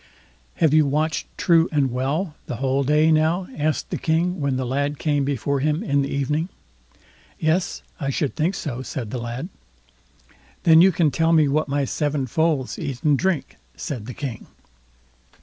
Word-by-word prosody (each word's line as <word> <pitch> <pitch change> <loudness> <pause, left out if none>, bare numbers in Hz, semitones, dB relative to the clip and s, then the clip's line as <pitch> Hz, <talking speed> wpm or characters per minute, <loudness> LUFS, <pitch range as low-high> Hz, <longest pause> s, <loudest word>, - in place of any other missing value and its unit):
"Have 160 -3 +3
you 155 -2 +5
watched 150 +1 0
true 165 -2 +4
and 140 -4 +1
well 145 +8 -1
the - - -3
whole 135 +2 0
day, 150 +3 +3
now?" 160 +4 +2
asked 155 0 -1
the - - -2
King, 170 +3 0
when 140 -2 0
the 130 - -2
lad 140 +3 -1
came 145 -2 0
before 140 +1 -1
him 150 +6 0
in 140 -9 +1
the 140 - -2
evening. 150 +5 -1 0.9
"Yes, 160 +4 0 0.2
I 140 -4 -2
should 140 0 -1
think 170 +5 0
so", 130 -7 -4
said 120 -4 -5
the 125 - -3
lad. 120 +8 -5 1.1
"Then 160 0 +7
you 190 +2 +6
can 160 -3 +2
tell 165 +2 +2
me 155 -2 +5
what 150 +3 +1
my 140 0 0
seven 145 0 -1
foals 150 0 0
eat 130 -3 -5
and 150 -2 +4
drink", 170 -1 -1 0.2
said 115 - -5
the 125 - -7
King. 130 -6 -6
150 Hz, 175 wpm, -23 LUFS, 135-160 Hz, 1.1 s, Then